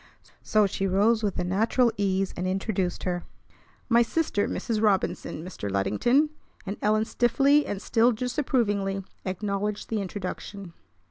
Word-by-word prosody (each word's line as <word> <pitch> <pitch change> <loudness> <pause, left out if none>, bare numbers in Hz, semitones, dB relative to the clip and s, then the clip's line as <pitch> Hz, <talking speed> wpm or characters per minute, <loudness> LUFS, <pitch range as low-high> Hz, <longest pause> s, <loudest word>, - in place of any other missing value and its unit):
So 215 -2 +3
she 195 0 -1
rose 210 +4 +3
with 205 -3 -1
a 180 - 0
natural 225 +6 +2
ease, 195 -2 0
and 180 +1 -2
introduced 190 -1 -1
her. 175 -1 -2 0.6
"My 235 -1 +5
sister 235 -4 0
Mrs. 220 -2 -2
Robinson, 190 -5 0
Mr. 140 - -5
Luddington"; 105 - +2 0.3
and 200 +1 -4
Ellen 215 +1 +2
stiffly 275 +6 +3
and 200 - -3
still 230 +3 +3
disapprovingly 215 -6 0 0.2
acknowledged 200 +2 -2
the 220 -2 -1
introduction. 195 -1 -6
205 Hz, 135 wpm, -26 LUFS, 190-230 Hz, 0.6 s, My